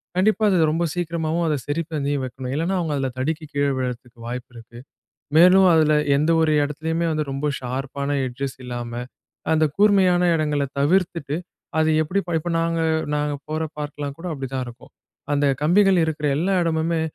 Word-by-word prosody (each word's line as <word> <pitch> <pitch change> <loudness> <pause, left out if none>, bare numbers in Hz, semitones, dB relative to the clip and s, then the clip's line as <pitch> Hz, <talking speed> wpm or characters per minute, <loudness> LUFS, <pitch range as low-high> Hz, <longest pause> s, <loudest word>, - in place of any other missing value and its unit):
கண்டிப்பா 215 +4 +2
அது 185 - +3
ரொம்ப 165 +2 0
சீக்கிரமாவும், 170 -1 -1
அத 155 - +1
சரி 145 +3 -1
பண்ணி 145 -2 -1
வைக்கணும். 130 0 -6
இல்லன்னா 170 +5 0
அவுங்க 160 -4 -1
அதில 135 -1 -1
தடுக்கி 155 +4 -2
கீழ 140 0 +1
விழறதுக்கு 125 -1 -5
வாய்ப்பு 125 +1 -5
இருக்கு. 115 0 -13 0.6
மேலும் 185 +2 +7
அதில 155 -1 +4 0.2
எந்த 155 +3 +2
ஒரு 160 -1 +3
இடத்துலயுமே 160 +3 -2
வந்து 155 -1 0
ரொம்ப 135 +2 -3
ஷார்ப்பான 135 +2 -4 0.2
எட்ஜஸ் 130 +2 -5
இல்லாம, 120 -1 -5 0.6
அந்த 155 0 +3
கூர்மையான 190 -4 +4
இடங்கள 150 -2 0
தவிர்த்துட்டு, 165 -1 +1 0.4
அது 160 0 +3
எப்பிடி 190 +6 -1 0.2
இப்ப 175 +2 -4
நாங்க 165 0 0 0.3
நாங்க 150 0 -1
போற 155 +1 -2 0.2
பார்க்லாம் 145 -1 -5
கூட 180 - -6
அப்பிடிதான் 135 -2 -4
இருக்கும். 120 0 -13 0.4
அந்த 145 0 +2 0.2
கம்பிகள் 185 +3 +4
இருக்கிற 155 -1 -3
எல்லா 185 +5 +1
இடமுமே, 165 0 0
155 Hz, 155 wpm, -22 LUFS, 140-170 Hz, 0.6 s, மேலும்